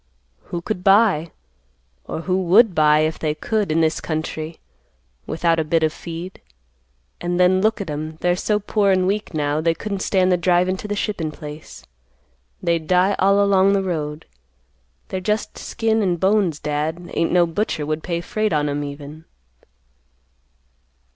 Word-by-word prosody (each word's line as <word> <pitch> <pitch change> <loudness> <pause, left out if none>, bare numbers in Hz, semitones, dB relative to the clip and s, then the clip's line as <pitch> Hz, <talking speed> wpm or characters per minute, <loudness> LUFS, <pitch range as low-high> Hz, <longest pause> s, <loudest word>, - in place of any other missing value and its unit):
"Who 175 - -5
could 185 -3 -4
buy? 195 -5 +4 0.8
or - - -5
who 185 +2 0
would 200 +4 +5
buy, 150 -1 +4
if 155 +1 -1
they 150 -1 -1
could, 210 +2 -1
in 165 +1 +2
this 160 0 +1
country, 155 0 -4 0.7
without 165 +1 +1
a - - +1
bit 160 +1 +1
of 155 -1 +1
feed? 170 +2 -8 0.8
And 175 0 -2
then 185 +1 +4
look 220 +2 +1
at 195 -5 -5
'em, 155 +2 -5
they're 175 0 +2
so 210 +3 0
poor 205 0 +1
an' 185 -1 +2
weak, 200 -2 -2
now, 150 0 0
they 165 0 +1
couldn't 200 +3 -4
stand 185 -1 +2
the 180 - +3
drivin' 180 +1 +2
to 210 - -7
the 205 - -2
shippin' 200 -7 -2
place. 150 0 -10 0.8
They'd 170 -2 0
die 185 +2 +3
all 200 +1 +4
along 195 0 +4
the 195 -1 +1
road. 155 -4 -3 0.8
They're 190 - -3
just 210 +3 -2
skin 225 -1 0
an' 185 -4 +1
bones, 190 -3 +1
Dad; 155 +4 -3
ain't 165 - 0
no 175 -1 +4
butcher 165 -3 -2
would 155 +1 -2
pay 170 -1 -3
freight 215 0 -1
on 150 -1 +1
'em, 145 +1 -2
even." 145 +2 -8
175 Hz, 165 wpm, -21 LUFS, 155-195 Hz, 0.8 s, would